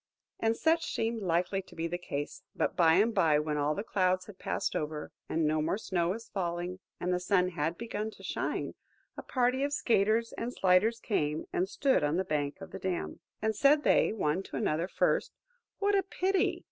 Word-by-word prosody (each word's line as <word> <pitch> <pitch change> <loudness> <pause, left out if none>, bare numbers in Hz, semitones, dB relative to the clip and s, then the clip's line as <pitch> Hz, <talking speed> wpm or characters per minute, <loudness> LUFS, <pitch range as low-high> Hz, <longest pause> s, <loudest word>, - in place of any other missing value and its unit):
And 225 0 +1
such 330 +1 +2
seemed 225 0 -1
likely 180 +1 0
to 190 - -17
be 165 - -2
the 175 +1 -3
case; 145 -4 -5
but - - 0
by 165 -2 +5
and 220 +5 +3
by, 155 -6 +4
when 150 0 -1
all 145 +1 +1
the 200 - -3
clouds 185 -3 +1
had 205 -3 -13
passed - - -2
over, 150 0 -3 0.2
and 160 0 +1
no 155 0 +2
more 160 +5 0
snow 175 -6 -1
was 225 +5 -4
falling, 175 -1 -3 0.2
and 180 +1 0
the 180 - +1
sun 180 0 +2
had 165 -1 -2
begun 220 -2 -3
to - - -15
shine, - - -2 0.4
a - - -6
party 255 +1 +1
of 285 0 -1
skaters 225 -2 +2
and 235 +1 -3
sliders 195 +5 +3
came 155 -9 -1
and 185 +2 0
stood 265 - +2
on 150 +3 +1
the 190 - 0
bank 150 +1 -2
of 195 - -9
the 190 - -6
dam. 185 -1 -3 0.2
And 220 0 +1
said 285 +6 +4
they - - +4
one 185 -5 0
to - - -9
another,–first, 165 +5 0 0.4
"What 405 0 +1
a 390 - +4
pity!" 380 +1 0
185 Hz, 200 wpm, -30 LUFS, 165-225 Hz, 0.4 s, by